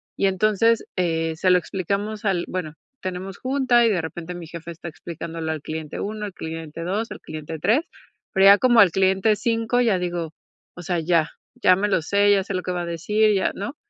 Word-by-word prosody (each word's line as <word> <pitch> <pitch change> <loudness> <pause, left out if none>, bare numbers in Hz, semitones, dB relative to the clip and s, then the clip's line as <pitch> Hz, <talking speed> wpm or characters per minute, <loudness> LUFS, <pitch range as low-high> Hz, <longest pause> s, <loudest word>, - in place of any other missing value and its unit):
Y 195 - +2
entonces, 215 +4 +2
eh, 165 -3 0
se 185 +3 +1
lo 180 - +6
explicamos 200 +4 -3
al 185 -4 +1
bueno, 160 -4 -4 0.3
tenemos 185 +1 -5
junta 255 -2 +2
y 230 - +4
de 190 -4 +1
repente 170 +2 -6
mi 175 -1 -8
jefe 170 +1 -9
está 170 +1 -9
explicándolo 165 0 -6
al 155 -2 -4
cliente 155 -1 -6
1, 210 +1 -4
al 200 - -7
cliente 160 -1 -7
2, 205 +6 -2
al - - -7
cliente 155 +1 -7
3, 230 - +3 0.5
pero 190 0 +4
ya 200 +1 +9
como 240 -1 +4
al 200 -5 +7
cliente 190 +4 +2
5 230 +2 0
ya 220 -6 +3
digo, 175 -3 -3 0.4
o 175 - -9
sea, 175 0 -1
ya, 165 -1 +1 0.3
ya 185 - +7
me 205 +3 0
lo 190 -5 +1
sé, 205 +3 +3
ya 195 -1 +3
sé 195 - -5
lo 185 - -1
que 180 - -4
va 175 -1 -2
a - - -4
decir 210 +6 +1
ya, 190 - +1
¿no? 220 +9 -5
185 Hz, 215 wpm, -23 LUFS, 165-210 Hz, 0.5 s, ya